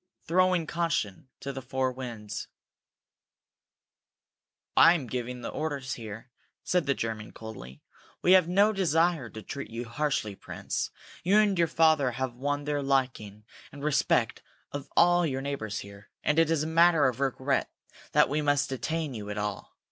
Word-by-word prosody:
throwing 180 0 +3
caution 165 - -2
to 140 - -5
the 135 - -6
four 130 0 -1
winds. 120 -5 -6 2.3
"I 165 +2 +8
am 150 -6 -3
giving 125 +1 -4
the 115 - -4
orders 145 -4 -3
here," 115 +2 -8 0.3
said 180 -5 +1
the 140 - +2
German, 110 -2 -4
coldly. 85 - -10 0.4
"We 180 - +5
have 185 -3 +7
no 200 +4 +4
desire 165 - +1
to 110 +1 -9
treat 140 +8 -6
you 115 +2 -5
harshly, 120 -3 -1
Prince. - - -4 0.3
You 195 +4 +4
and 210 -2 +4
your 170 -2 +3
father 155 -5 +3
have 130 0 -3
won 145 +3 -2
the 145 0 -1
liking 125 -7 -1 0.3
and 145 0 -10
respect 150 -1 +1 0.3
of 145 -1 -6
all 175 0 +5
your 135 -5 -1
neighbors 110 -7 -3
here, 100 +1 -13
and 150 +2 +2
it 165 -1 +4
is 160 -2 +1
a - - -3
matter 165 -1 +5
of 125 -1 -2
regret 135 0 0 0.4
that - - +5
we 150 +2 0
must 145 -1 +2
detain 155 +2 -2
you 105 -3 -6
at 105 - -4
all. 105 -1 -4
140 Hz, 165 wpm, -28 LUFS, 120-160 Hz, 2.3 s, I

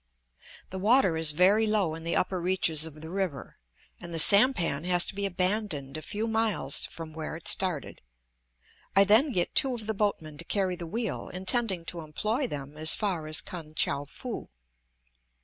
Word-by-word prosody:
The 190 - -5
water 205 -3 +3
is 160 -1 +1
very 195 +7 +3
low 205 -7 +1
in 160 0 -8
the 170 - -2
upper 185 -1 -1
reaches 165 -3 +1
of 155 -1 -13
the 160 - -9
river, 185 -8 -5 0.4
and 175 - -9
the 165 - -4
sampan 190 - +6
has 180 -1 +3
to - - -7
be 200 0 -2
abandoned 180 -7 -2
a 155 - -5
few 210 +8 -4
miles 220 -11 +1
from 160 -1 -10
where 160 0 -6
it 160 - -8
started. 180 -6 +1 0.9
I 195 - +7
then 220 +9 +3
get 180 -7 -1
two 270 -4 +3
of 220 -3 -7
the 220 - -2
boatmen 195 -8 -3
to - - +1
carry 190 0 -1
the 170 -1 -8
wheel, 225 +4 -4
intending 190 -1 -1
to 170 - -7
employ 215 - -3
them 145 - -8
as 155 +1 +6
far 180 -7 -3
as 155 0 0
Kan 155 -3 -9
tchou 140 -2 -1
foo. 245 - -8
180 Hz, 185 wpm, -27 LUFS, 160-210 Hz, 0.9 s, I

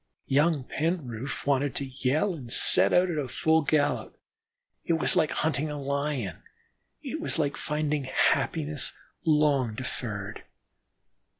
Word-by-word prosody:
Young 145 +1 +2
Penroof 140 -5 -3
wanted 140 -1 +1
to 140 - -2
yell 135 +7 0
and 130 -8 -9
set 95 -4 +6
out 180 0 +3
at 150 -5 -3
full 160 +3 +2
gallop. 150 0 0 0.6
It 170 - 0
was 165 +3 +2
like 160 -4 +3
hunting 155 -1 -1
a 150 -1 -5
Lion; 140 - -3 0.6
it - - -5
was - - -1
like 145 -3 0
finding 150 -2 -2
happiness 145 +2 0 0.3
long 145 -7 +2
deferred. 110 -4 -6
145 Hz, 125 wpm, -27 LUFS, 130-155 Hz, 0.6 s, set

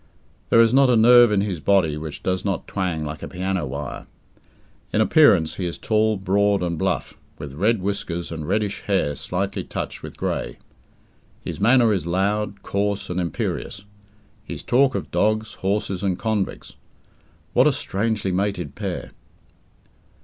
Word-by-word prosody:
There - - +5
is 115 0 +5
not 135 0 +5
a 125 - +4
nerve 120 +1 +7
in 100 -2 +2
his 100 -5 -2
body 85 -3 +2
which 75 -1 -7
does 95 0 -1
not 100 -4 -2
twang 90 -6 -2
like 75 +1 -6
a - - -5
piano 95 -3 -2
wire. 70 +1 -6 0.8
In - - +1
appearance, 110 - +4
he 90 - -2
is 85 - -5
tall, 110 -1 +1
broad, 100 +1 +1
and 85 -1 -1
bluff, 80 - -2 0.2
with 70 -2 -8
red 105 +5 +1
whiskers 85 -4 -3
and 80 -2 -5
reddish 100 +1 -1
hair 95 -8 +1
slightly 95 +5 -3
touched - - -5
with - - -9
grey. - - -3 0.8
His - - -6
manner 120 0 +5
is 90 -4 -2
loud, 100 +3 -1
coarse, 100 -1 -2
and 90 - -2
imperious; 90 +3 -4 0.6
his - - -7
talk 135 +1 +3
of - - -4
dogs, 110 +1 0
horses, 100 -1 -1
and 95 -3 0
convicts. 110 -3 -3 0.8
What - - +5
a - - +5
strangely 105 -1 -1
mated 90 -5 -2
pair! - - -5
100 Hz, 155 wpm, -22 LUFS, 90-110 Hz, 0.8 s, nerve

